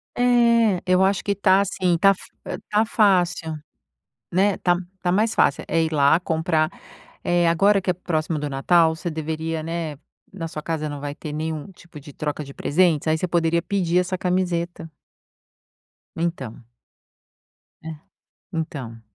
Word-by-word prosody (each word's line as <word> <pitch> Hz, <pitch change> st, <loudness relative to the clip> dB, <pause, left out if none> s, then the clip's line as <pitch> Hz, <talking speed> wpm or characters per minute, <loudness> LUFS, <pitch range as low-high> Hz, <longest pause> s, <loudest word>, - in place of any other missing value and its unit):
É, 235 Hz, -5 st, +3 dB
eu 185 Hz, +1 st, +3 dB
acho 195 Hz, 0 st, +1 dB
que 200 Hz, -1 st, 0 dB
tá, 195 Hz, 0 st, +4 dB
assim, 185 Hz, -3 st, 0 dB
tá 195 Hz, +4 st, +5 dB
f -, -, -15 dB, 0.5 s
tá 210 Hz, +2 st, +3 dB
fácil, 180 Hz, -7 st, +2 dB, 0.8 s
né, 195 Hz, +2 st, +2 dB
tá 175 Hz, -1 st, +2 dB, 0.3 s
tá 175 Hz, -, +1 dB
mais 215 Hz, +4 st, +2 dB
fácil, -, -, +2 dB
é 165 Hz, 0 st, +1 dB
ir 160 Hz, -, -2 dB
lá 145 Hz, +1 st, +4 dB
comprar, 160 Hz, -2 st, 0 dB, 0.5 s
eh, 175 Hz, -1 st, +2 dB
agora 195 Hz, +4 st, +4 dB
que 185 Hz, -, -3 dB
é -, -, +3 dB
próximo 160 Hz, -2 st, -2 dB
do 145 Hz, 0 st, -3 dB
Natal 160 Hz, +4 st, +3 dB
você 170 Hz, +1 st, -4 dB
deveria, 160 Hz, 0 st, -3 dB
né, 165 Hz, -3 st, -4 dB, 0.3 s
na 170 Hz, -4 st, -5 dB
sua 155 Hz, -1 st, -6 dB
casa 155 Hz, -1 st, -3 dB
não 145 Hz, -1 st, -6 dB
vai 145 Hz, 0 st, -5 dB
ter 155 Hz, -1 st, -7 dB
nenhum 155 Hz, 0 st, -4 dB
tipo 170 Hz, -4 st, -14 dB
de 145 Hz, 0 st, -13 dB
troca 150 Hz, 0 st, -3 dB
de 140 Hz, -1 st, -11 dB
presentes, 160 Hz, 0 st, +1 dB
aí 155 Hz, 0 st, +2 dB
você 180 Hz, -, -2 dB
poderia 170 Hz, -1 st, +1 dB
pedir 180 Hz, -2 st, +1 dB
essa 180 Hz, +1 st, -1 dB
camiseta. 175 Hz, -2 st, -2 dB, 1.3 s
Então. 150 Hz, -9 st, -4 dB, 1.2 s
É, 160 Hz, -, -8 dB, 0.6 s
então. 140 Hz, -9 st, -5 dB
170 Hz, 155 wpm, -23 LUFS, 155-185 Hz, 1.3 s, tá